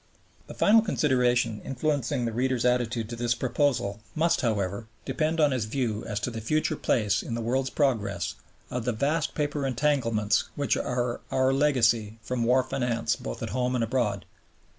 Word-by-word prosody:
The - - -9
final 220 +2 +5
consideration 125 - +1
influencing 135 -2 -1
the 115 - -1
reader's 125 +1 0
attitude 120 -2 +1
to 120 - -4
this 120 0 0
proposal 125 -5 0 0.2
must, 165 +2 +2
however, 100 -2 -1 0.2
depend 160 +1 -1
on 150 -2 +4
his 125 -4 0
view 115 -2 -2
as 105 -1 -2
to 125 - -2
the 115 -1 -5
future 155 +6 0
place 105 -7 +1
in 115 - -4
the - - -3
world's 130 +3 0
progress 100 - 0 0.4
of 125 -2 -3
the 125 - +1
vast 145 +7 0
paper 145 -1 -1
entanglements 115 -6 +1
which 145 -1 +1
are 120 -1 -2
our 130 0 +2
legacy 115 -6 +2
from 120 0 -1
war 125 +2 +4
finance 120 -4 -1
both - - -6
at - - -3
home 125 +2 0
and 120 - +1
abroad. 110 -5 -1
125 Hz, 170 wpm, -27 LUFS, 115-135 Hz, 0.4 s, final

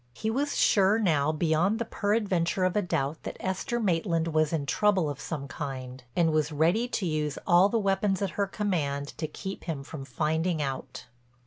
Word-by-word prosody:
He 220 0 -2
was 285 +4 -1
sure 200 +1 +4
now 155 -9 +2
beyond 165 +6 +1
the 235 - -2
peradventure 200 -5 0
of 185 -1 +1
a 210 - +3
doubt 150 -4 -2
that - - -6
Esther 190 +5 -2
Maitland 165 -4 +1
was 155 -1 +2
in 155 -4 -1
trouble 190 +3 +2
of 140 - -8
some 145 -4 -4
kind, 130 -1 -6
and 165 -2 +3
was 155 0 +1
ready 170 +11 +2
to 215 -5 -2
use 150 -3 -1
all 175 +3 +5
the 230 - +1
weapons 195 -2 +1
at 195 - -1
her 200 +3 -1
command 150 -9 -1
to 155 - -1
keep 190 +5 -7
him 155 -5 -3
from 140 0 -8
finding 160 +5 -1
it - - +1
out. 135 -1 -5
170 Hz, 195 wpm, -28 LUFS, 150-195 Hz, -, all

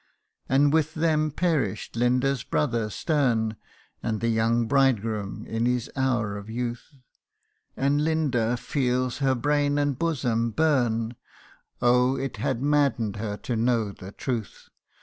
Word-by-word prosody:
And 140 +2 +4
with 160 -1 +1
them 155 -1 +2
perish'd 150 - -1
Linda's 125 +2 +1
brother 115 -6 0
stern, 115 - 0 0.5
And 110 -2 -2
the 115 - 0
young 115 +1 +2
bridegroom 115 -6 +1
in 115 +1 -1
his 125 -2 -1
hour 120 -6 0
of 100 +1 -9
youth: 120 +5 -5 0.8
And 140 +2 +2
Linda 135 -7 +1
feels 125 -1 -1
her 135 -2 +2
brain 145 +3 +1
and 145 -2 0
bosom 125 -8 0
burn 120 -4 +1 0.7
Oh! 125 +2 +4
it 135 +1 -4
had 130 -1 -1
madden'd 140 -8 +1
her 105 -1 -3
to 120 - -3
know 115 -2 +1
the 95 0 -10
truth 115 -2 -5
125 Hz, 130 wpm, -26 LUFS, 115-145 Hz, 0.8 s, And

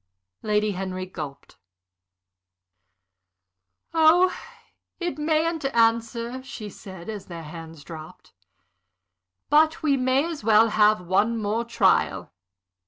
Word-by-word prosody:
Lady 210 0 +1
Henry 185 -1 -4
gulped. 150 -6 -9 2.4
"Oh, 335 +3 +5 0.6
it 345 -4 -3
mayn't 315 +1 0
answer," 230 0 +1
she 230 -6 -8
said, 190 -3 -11
as 215 -3 -6
their 170 -2 -8
hands 160 -1 -10
dropped. 165 +3 -11 1.2
"But 310 +2 +4
we 285 -3 +3
may 260 +3 +2
as 330 -7 -6
well 220 +1 +5
have 215 -1 +4
one 215 +6 +1
more 220 +3 -1
trial. 235 - +1
225 Hz, 105 wpm, -24 LUFS, 185-275 Hz, 2.4 s, Oh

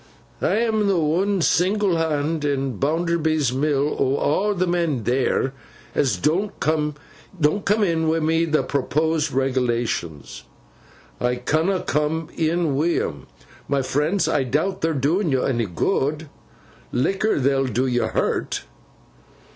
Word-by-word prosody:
'I'm 220 -2 +1
th' 195 - +2
one 180 +5 +1
single 190 +2 +2
Hand 155 -1 -1
in 135 -5 -1
Bounderby's 155 -2 +1
mill, 145 +1 +1
o' 145 +8 +1
a' 205 - 0
the 185 0 +1
men 170 -8 0
theer, 130 +2 +1 0.4
as 135 - +1
don't 190 +8 0
coom 150 -1 0 0.5
in 195 -2 +1
wi' 160 +1 +2
th' 155 -1 +1
proposed 155 +2 0
reg'lations. 120 - -1 0.8
I 125 0 +1
canna 160 +9 0
coom 150 +2 -1
in 165 -1 +1
wi' 165 +5 +1
'em. 70 -3 -5 0.4
My 140 -1 +1
friends, 150 +9 0
I 145 - +1
doubt 155 +9 -1
their 165 -1 0
doin' 155 +6 +1
yo 130 -1 +1
onny 120 -4 0
good. 150 - -1 0.6
Licker 195 - +1
they'll 135 0 +2
do 125 +2 0
yo 120 -2 +1
hurt. - - -1
155 Hz, 125 wpm, -22 LUFS, 135-170 Hz, 0.8 s, th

